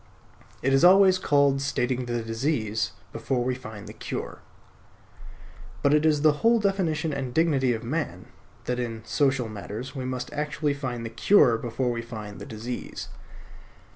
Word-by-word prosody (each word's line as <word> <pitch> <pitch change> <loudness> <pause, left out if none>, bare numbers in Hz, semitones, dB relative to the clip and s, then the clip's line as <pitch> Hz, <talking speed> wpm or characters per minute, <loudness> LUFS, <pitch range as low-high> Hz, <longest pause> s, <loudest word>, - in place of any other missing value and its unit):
It 135 +1 +2
is 135 - +4
always 185 +1 +7
called 140 -4 +3
stating 130 -2 -1
the 120 -1 -2
disease 115 -3 -1 0.2
before 120 +2 -1
we 130 +1 0
find 110 -5 -9
the - - -9
cure. - - -6 1.4
But 140 - +4
it 150 +1 +4
is 150 -1 +2
the 150 -1 +4
whole 230 0 +5
definition 180 -6 0
and 130 -3 -4
dignity 145 -6 +3
of 110 - -7
man 115 - -3 0.4
that 125 0 -1
in 115 -2 -4
social 135 -2 +1
matters 110 +5 -7
we 130 -2 -4
must 130 -1 -4
actually 150 0 -1
find 125 -4 -4
the 115 - -5
cure 125 - +5
before 120 +2 -2
we 115 -1 -3
find 110 -3 -8
the - - -7
disease. 115 +3 -6
130 Hz, 160 wpm, -26 LUFS, 115-150 Hz, 1.4 s, always